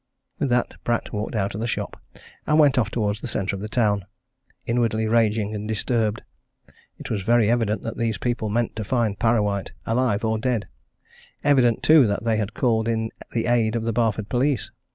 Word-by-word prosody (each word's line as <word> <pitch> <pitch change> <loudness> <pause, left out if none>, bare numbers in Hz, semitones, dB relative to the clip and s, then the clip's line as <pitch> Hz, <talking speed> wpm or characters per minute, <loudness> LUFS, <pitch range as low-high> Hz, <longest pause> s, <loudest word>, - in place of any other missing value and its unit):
With 140 - 0
that 120 0 -1
Pratt 120 0 -1
walked 105 +2 -3
out 100 -2 -1
of 105 - -5
the 115 - -1
shop - - -4 0.5
and 150 - +3
went 145 -4 +5
off 110 -3 +1
towards 105 -2 -1
the - - -4
centre 100 0 -2
of 95 - -7
the 105 - -5
town, 105 -5 +1 0.6
inwardly 115 -2 +1
raging 110 -2 +1
and 105 0 -4
disturbed. 110 0 -1 0.7
It - - -8
was 105 -3 -1
very 115 +1 +3
evident 115 -3 0
that 115 - -5
these 115 -3 -1
people 120 -1 -2
meant 115 +2 -1
to 110 - -2
find 110 -2 0
Parrawhite, 105 -4 +1
alive 115 -2 +1
or 110 0 0
dead; 120 -3 -1 0.8
evident, 130 -4 +3
too, 150 -3 +6
that 100 +1 -2
they 115 -1 +1
had 105 -1 -3
called 115 -3 +1
in 110 -1 -1 0.2
the 115 - 0
aid 120 -2 +2
of 115 - -1
the 115 0 -1
Barford 110 -2 0
police. 125 -4 0
110 Hz, 195 wpm, -23 LUFS, 105-120 Hz, 0.8 s, too